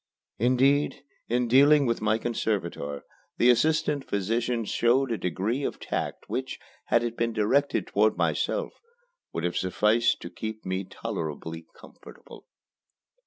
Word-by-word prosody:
Indeed, 135 +5 +2 0.2
in 120 +1 +1
dealing 140 +4 +6
with 115 -2 0
my 110 +1 +2
conservator 95 -11 -3 0.3
the 125 - +6
assistant 150 +3 +1
physician 115 +4 -1
showed 120 +5 +2
a 115 - 0
degree 100 - -1
of - - -3
tact - - -4
which, - - -3 0.3
had 120 - +2
it 120 -1 -3
been 115 0 -1
directed 125 +7 +1
toward 105 +1 +2
myself, - - 0 0.6
would 85 - -4
have 90 0 -1
sufficed 105 +5 +2
to 85 - -7
keep 110 +4 -6
me 95 +1 -2
tolerably 80 0 -5
comfortable. - - -14
115 Hz, 130 wpm, -27 LUFS, 100-125 Hz, 0.6 s, dealing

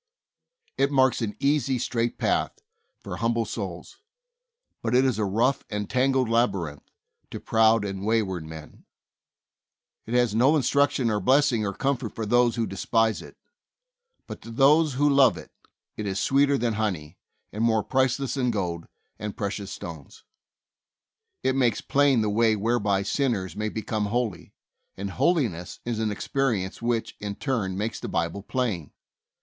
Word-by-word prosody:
It 135 +1 +3
marks 130 -3 +3
an 105 -2 -2
easy, 140 -2 +1
straight 120 -1 -1
path - - 0 0.5
for - - -6
hum 115 0 0
ble 115 -1 0
souls, 95 - -6 0.8
but 115 +1 0
it 130 +1 +5
is 125 -5 +1
a 105 - +1
rough 115 +8 +1
and 105 -1 -3
tangled 130 +1 +2
labyrinth 95 - -1 0.4
to - - -6
proud 110 -1 +3
and 95 -1 -4
wayward 105 -6 0
men. 80 -1 -11 1.2
It 115 - -2
has 120 -3 +3
no 130 +7 +4
instruction, 140 -4 +2
or 105 - 0
blessing, 130 -1 +3
or 100 - -2
comfort 135 -5 -2
for 110 - -3
those 120 +2 +3
who 115 -1 0
despise 110 +3 0
it, - - -13 0.9
but - - -9
to - - -11
those 140 +5 +4
who 145 +3 +3
love 135 -4 +5
it - - -11 0.4
it 105 - -4
is 95 0 -2
sweeter 140 +1 +3
than 120 -2 0
honey, 95 -7 -3 0.3
and 105 +2 -2
more 110 -2 +2
priceless 130 0 0
than 130 -3 0
gold 90 -7 -3 0.3
and 105 -1 -5
precious 100 -1 -4
stones. 80 -5 -9 1.2
It 130 0 +1
makes 120 -5 +2
plain 140 -4 +3
the 105 - 0
way 110 +1 +3
whereby 105 -2 +1
sinners 105 -5 -1
may 105 +1 -2
become 110 -1 -2
holy, 115 -4 -3 0.4
and 100 0 -4
holiness 125 - 0
is 120 -2 -2
an 110 -1 0
experi 115 0 -1
ence 95 - -10
which, 115 -1 -1
in 100 -1 -4
turn, 105 -9 -2
makes 110 +3 -3
the - - -6
Bible 85 +4 -2
plain. 105 - -3
115 Hz, 160 wpm, -26 LUFS, 100-130 Hz, 1.2 s, it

